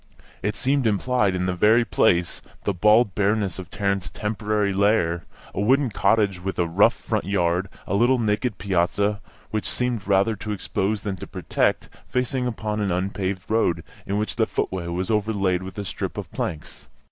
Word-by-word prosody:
It 105 Hz, +1 st, -1 dB
seemed 135 Hz, -2 st, +1 dB
implied 105 Hz, -1 st, +1 dB
in 90 Hz, 0 st, -1 dB
the 90 Hz, -, 0 dB
very 110 Hz, +6 st, +4 dB
place, 85 Hz, -4 st, +2 dB, 0.2 s
the 100 Hz, -, 0 dB
bald 105 Hz, +3 st, +4 dB
bareness 100 Hz, -1 st, 0 dB
of 90 Hz, -, -8 dB
Tarrant's 100 Hz, -2 st, -1 dB
temporary 105 Hz, -1 st, -1 dB
lair, 95 Hz, -4 st, +2 dB, 0.3 s
a 100 Hz, -, -2 dB
wooden 130 Hz, +3 st, +3 dB
cottage, 100 Hz, -2 st, +2 dB
with 95 Hz, +2 st, -4 dB
a 85 Hz, -, +2 dB
rough 100 Hz, +8 st, +4 dB
front 110 Hz, -2 st, -2 dB
yard, 90 Hz, -1 st, +1 dB, 0.2 s
a -, -, -3 dB
little 120 Hz, +6 st, +4 dB
naked 110 Hz, -1 st, 0 dB
piazza, 100 Hz, +2 st, 0 dB, 0.3 s
which 110 Hz, -1 st, -1 dB
seemed 125 Hz, -5 st, -1 dB
rather 100 Hz, +3 st, +3 dB
to 105 Hz, +2 st, -4 dB
expose 100 Hz, +1 st, -2 dB
than 100 Hz, -2 st, -3 dB
to -, -, -8 dB
protect, -, -, 0 dB, 0.2 s
facing 125 Hz, 0 st, 0 dB
upon 110 Hz, -3 st, -3 dB
an 100 Hz, -2 st, 0 dB
unpaved 95 Hz, +1 st, -2 dB
road, 90 Hz, -7 st, +1 dB, 0.2 s
in 100 Hz, -, 0 dB
which 105 Hz, +3 st, -2 dB
the 110 Hz, -2 st, +2 dB
footway 90 Hz, -2 st, -2 dB
was 90 Hz, +4 st, -2 dB
overlaid 100 Hz, -4 st, +1 dB
with 95 Hz, +2 st, -8 dB
a 100 Hz, -, -3 dB
strip -, -, -4 dB
of -, -, -6 dB
planks. 75 Hz, -, -5 dB
100 Hz, 175 wpm, -24 LUFS, 95-110 Hz, 0.3 s, very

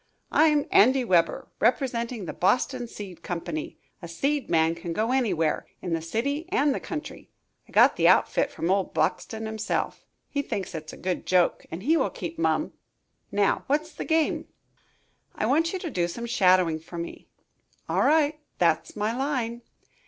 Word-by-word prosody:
"I'm 300 Hz, -2 st, +4 dB
Andy 255 Hz, +5 st, +5 dB
Weber, 170 Hz, -6 st, +2 dB
representing 235 Hz, -2 st, 0 dB
the -, -, -5 dB
Boxton 245 Hz, +5 st, +1 dB
Seed 190 Hz, -7 st, -9 dB
Company. 170 Hz, -3 st, -5 dB, 0.2 s
A 170 Hz, -, -7 dB
seed 275 Hz, -, -1 dB
man 160 Hz, -1 st, +3 dB
can 170 Hz, 0 st, -5 dB
go 220 Hz, +6 st, 0 dB
anywhere, 185 Hz, -12 st, +1 dB
in 175 Hz, -2 st, -3 dB
the 165 Hz, -, 0 dB
city 280 Hz, -, -2 dB
and 300 Hz, -8 st, +2 dB
the -, -, -3 dB
country. 315 Hz, -4 st, -7 dB, 0.4 s
I -, -, -16 dB
got -, -, +5 dB
the -, -, +4 dB
outfit -, -, +4 dB
from 170 Hz, -, -2 dB
old 195 Hz, -1 st, 0 dB
Boxton 220 Hz, 0 st, -1 dB
himself. 220 Hz, 0 st, -2 dB, 0.2 s
He 285 Hz, -, -1 dB
thinks 195 Hz, -9 st, -4 dB
it 155 Hz, -1 st, -6 dB
a -, -, -11 dB
good 185 Hz, -1 st, -3 dB
joke 180 Hz, -2 st, +2 dB
and 170 Hz, +4 st, -7 dB
he 320 Hz, +6 st, +3 dB
will -, -, +1 dB
keep 330 Hz, 0 st, -7 dB
mum. -, -, +1 dB, 0.6 s
Now, 200 Hz, -1 st, +2 dB
what's 305 Hz, +3 st, 0 dB
the -, -, -5 dB
game?" 320 Hz, -1 st, +1 dB, 0.9 s
"I -, -, -1 dB
want 320 Hz, +8 st, +2 dB
you 380 Hz, -, -2 dB
to 345 Hz, -4 st, -5 dB
do 175 Hz, -6 st, 0 dB
some 235 Hz, +7 st, -5 dB
shadowing 185 Hz, -8 st, +3 dB
for 165 Hz, +2 st, -10 dB
me." 170 Hz, 0 st, -7 dB, 0.6 s
"All -, -, +1 dB
right 305 Hz, -1 st, +3 dB, 0.2 s
that's 165 Hz, -3 st, +1 dB
my 215 Hz, +2 st, -1 dB
line." 250 Hz, -4 st, -2 dB
220 Hz, 170 wpm, -26 LUFS, 175-280 Hz, 0.9 s, Andy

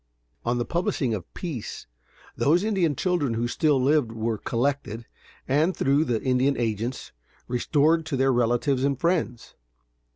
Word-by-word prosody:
On 120 Hz, +1 st, 0 dB
the 120 Hz, -, -1 dB
publishing 155 Hz, -8 st, -1 dB
of 95 Hz, -5 st, -6 dB
peace, 150 Hz, -, -6 dB, 0.5 s
those 170 Hz, +6 st, +3 dB
Indian 190 Hz, -8 st, +1 dB
children 150 Hz, -8 st, 0 dB
who 120 Hz, +1 st, 0 dB
still 145 Hz, +2 st, +2 dB
lived, 135 Hz, -2 st, +2 dB
were 110 Hz, -1 st, -2 dB
collected, 120 Hz, -2 st, -2 dB, 0.4 s
and, 155 Hz, +7 st, +2 dB
through 140 Hz, +3 st, +2 dB
the 120 Hz, -5 st, 0 dB
Indian 130 Hz, +2 st, +2 dB
agents, 115 Hz, +2 st, -3 dB, 0.4 s
restored 150 Hz, +6 st, +2 dB
to 145 Hz, -4 st, -2 dB
their 135 Hz, 0 st, +3 dB
relatives 120 Hz, +3 st, +1 dB
and 140 Hz, -2 st, 0 dB
friends. 165 Hz, -8 st, -1 dB
135 Hz, 140 wpm, -25 LUFS, 120-155 Hz, 0.5 s, those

